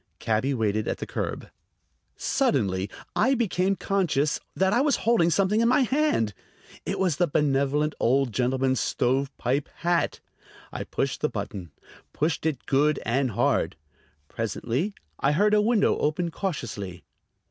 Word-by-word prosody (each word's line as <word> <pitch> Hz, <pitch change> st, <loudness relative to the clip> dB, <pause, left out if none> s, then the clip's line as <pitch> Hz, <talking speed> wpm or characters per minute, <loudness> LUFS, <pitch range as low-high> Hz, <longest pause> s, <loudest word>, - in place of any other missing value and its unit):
Cabby 115 Hz, +5 st, 0 dB
waited 110 Hz, -2 st, 0 dB
at -, -, -1 dB
the -, -, -5 dB
curb. -, -, -4 dB, 0.7 s
Suddenly 95 Hz, 0 st, 0 dB, 0.3 s
I 270 Hz, +1 st, +3 dB
became 195 Hz, -5 st, +1 dB
conscious 175 Hz, -8 st, 0 dB, 0.2 s
that 190 Hz, +1 st, +2 dB
I 240 Hz, -, +3 dB
was 290 Hz, 0 st, +3 dB
holding 225 Hz, -8 st, +4 dB
something 200 Hz, +5 st, +2 dB
in 230 Hz, -, +3 dB
my 255 Hz, +4 st, +4 dB
hand. 260 Hz, -, +1 dB, 0.5 s
It -, -, -1 dB
was 180 Hz, -6 st, +1 dB
the 175 Hz, -, +2 dB
benevolent 145 Hz, +1 st, +1 dB
old 130 Hz, 0 st, +2 dB
gentleman's 130 Hz, +1 st, +1 dB
stovepipe 135 Hz, +1 st, 0 dB
hat! 170 Hz, 0 st, 0 dB, 0.5 s
I -, -, -4 dB
pushed -, -, -2 dB
the -, -, +1 dB
button: 90 Hz, -4 st, -5 dB, 0.4 s
pushed 155 Hz, +1 st, 0 dB
it 145 Hz, -5 st, -3 dB
good 150 Hz, +3 st, +2 dB
and 130 Hz, +3 st, +1 dB
hard. 105 Hz, -, +1 dB, 0.5 s
Presently 120 Hz, -, -2 dB, 0.2 s
I 140 Hz, +2 st, +2 dB
heard 210 Hz, +7 st, +3 dB
a 210 Hz, -, +5 dB
window 220 Hz, -1 st, +3 dB
open 165 Hz, +3 st, 0 dB
cautiously. 105 Hz, -, -4 dB
150 Hz, 140 wpm, -26 LUFS, 125-190 Hz, 0.7 s, a